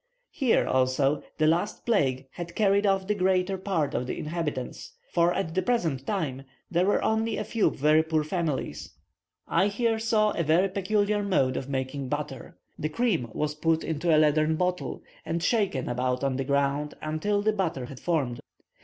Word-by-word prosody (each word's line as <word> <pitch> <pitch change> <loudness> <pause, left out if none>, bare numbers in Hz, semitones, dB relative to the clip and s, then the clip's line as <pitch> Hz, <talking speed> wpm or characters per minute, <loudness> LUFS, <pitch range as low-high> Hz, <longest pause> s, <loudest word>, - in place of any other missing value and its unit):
Here, 260 -5 +2
also, 130 +3 +2 0.2
the 155 - +2
last 170 +6 0
plague 135 - +1
had 170 -1 -7
carried 200 -1 +3
off 195 -1 +2
the 210 - +1
greater 190 -1 +1
part 185 -6 -1
of 125 - -2
the - - -3
inhabitants; 150 -5 -4 0.2
for, 170 0 +3
at 175 -3 -2
the 185 - +1
present 165 - -1
time, 155 -10 -2 0.3
there 180 +2 +2
were 205 - +2
only 220 0 +1
a - - -1
few 220 +1 +1
very 150 +3 +3
poor 160 -1 0
families. 155 - -3 0.5
I 190 +4 +3
here 225 +2 0
saw 220 -1 +2
a - - -1
very 170 +5 +3
peculiar 205 +2 +1
mode 185 -11 +1
of 135 - -4
making 135 0 -3
butter. - - -5 0.2
The 155 - -1
cream 170 - 0
was 150 +5 -2
put 160 +1 +1
into 160 +2 -2
a 155 - +6
leathern 155 +1 +3
bottle, 180 +2 -2 0.2
and 165 +1 -2
shaken 195 - +1
about 125 +1 -1
on 135 -2 0
the 135 - -2
ground 140 +1 0
until 205 +7 -1
the 215 0 +2
butter 165 -10 -2
had 130 0 -10
formed. 140 -9 -1
165 Hz, 180 wpm, -27 LUFS, 140-200 Hz, 0.5 s, a